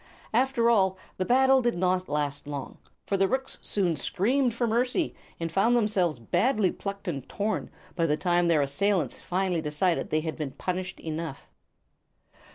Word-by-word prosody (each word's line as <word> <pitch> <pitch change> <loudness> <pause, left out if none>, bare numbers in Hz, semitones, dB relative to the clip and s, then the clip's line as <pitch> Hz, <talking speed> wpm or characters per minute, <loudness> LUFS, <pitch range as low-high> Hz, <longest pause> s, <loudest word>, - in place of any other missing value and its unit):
After 245 0 +2
all, 190 -5 +3 0.2
the 185 - -1
battle 265 +2 +5
did 240 -5 0
not 185 0 0
last 145 -1 -2
long; 145 -2 -6 0.3
for 195 - 0
the 195 0 +3
rooks 265 +4 -2
soon 180 -5 0
screamed 240 - +1
for 240 - 0
mercy, 250 +8 0 0.3
and 165 -1 -3
found 210 +7 +3
themselves 190 - +1
badly 200 - +1
plucked 200 0 -6
and 140 -7 -4
torn 215 +1 -2 0.3
by 165 -2 +1
the 150 0 +1
time 175 0 +2
their 160 -4 +4
assailants 185 +6 0
finally 180 -2 0
decided 155 +3 0
they 155 - +1
had 160 0 -4
been 145 -4 -4
punished 180 0 -4
enough. 160 -3 -6
185 Hz, 165 wpm, -27 LUFS, 160-225 Hz, 0.3 s, battle